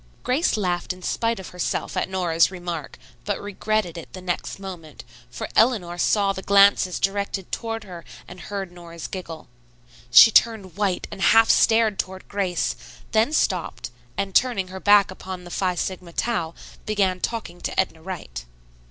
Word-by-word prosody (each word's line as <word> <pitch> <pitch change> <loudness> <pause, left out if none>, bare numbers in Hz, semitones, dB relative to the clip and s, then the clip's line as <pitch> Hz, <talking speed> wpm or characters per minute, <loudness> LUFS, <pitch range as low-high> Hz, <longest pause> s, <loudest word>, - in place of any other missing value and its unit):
Grace 260 +1 +1
laughed 180 -3 -1
in 180 0 -15
spite 230 +1 -1
of 190 - -8
herself 180 -1 -3
at - - -1
Nora's 175 -3 +2
remark, 175 -5 -6 0.3
but 205 -1 -2
regretted 205 -3 -2
it 165 - -12
the 185 - -7
next 180 -1 -3
moment, 180 -6 -9 0.3
for 125 - -6
Eleanor 210 -8 +3
saw 200 0 +2
the 190 - -6
glances 200 -2 +4
directed 195 -1 -2
toward 225 -1 -3
her 175 -4 -10 0.2
and 180 - -11
heard 195 +1 -5
Nora's 170 -2 -10
giggle. 170 -4 -7 0.6
She 125 - +9
turned 210 -6 +2
white 200 -3 -1
and 195 - -8
half 225 +3 +6
started 225 -3 +3
toward 190 0 -4
Grace, 190 -3 -1 0.4
then 225 +5 +3
stopped, 185 - -1 0.3
and, 200 -1 -2
turning 225 -7 +2
her 190 +1 -7
back 205 -1 +5
upon 185 -1 -8
the 175 - -11
Phi 185 -1 0
Sigma 180 -1 -4
Tau, 170 -9 -1 0.3
began 195 -4 +1
talking 180 -5 -4
to - - -3
Edna 175 -4 0
Wright. 180 - -7
190 Hz, 160 wpm, -23 LUFS, 175-205 Hz, 0.6 s, She